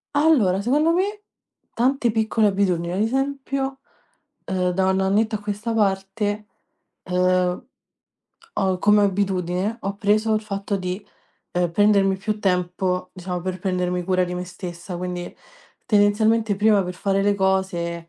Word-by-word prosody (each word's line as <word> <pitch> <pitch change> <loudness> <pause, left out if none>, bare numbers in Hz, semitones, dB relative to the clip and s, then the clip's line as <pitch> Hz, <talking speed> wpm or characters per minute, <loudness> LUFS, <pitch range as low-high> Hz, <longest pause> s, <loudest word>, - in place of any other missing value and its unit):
Allora, 250 - +3
secondo 295 +9 +2
me, 405 +4 0 0.5
tante 250 0 +1
piccole 220 0 +2
abitudini. 185 -4 0
Ad 185 - -2
esempio, 270 +3 -1 0.7
uhm, 180 -1 0
da 190 +1 +1
un 190 0 +1
annetto 215 +3 +1
a - - -3
questa 210 +2 -3
parte, 205 +1 -1 0.6
uhm, 180 +2 +1 0.9
ho 190 -2 +1
come 210 +1 +4
abitudine, 190 +1 0
ho 195 +1 -3
preso 215 +1 +2
il 215 - +1
fatto 200 -1 -3
di, 185 +2 -4 0.5
uhm, 175 -1 +1
prendermi 200 -1 +3
più 210 +2 -3
tempo, 180 -1 -1
diciamo, 180 -1 -4
per 185 +1 -4
prendermi 180 -1 -1
cura 185 0 +2
di 180 0 -5
me 180 - -3
stessa. 175 0 -7
Quindi, 180 0 -5 0.5
tendenzialmente 215 +1 +3
prima 210 -1 +3
per 180 0 -5
fare 195 +1 0
le 205 0 +2
cose 185 -3 -1
195 Hz, 140 wpm, -23 LUFS, 180-215 Hz, 0.9 s, come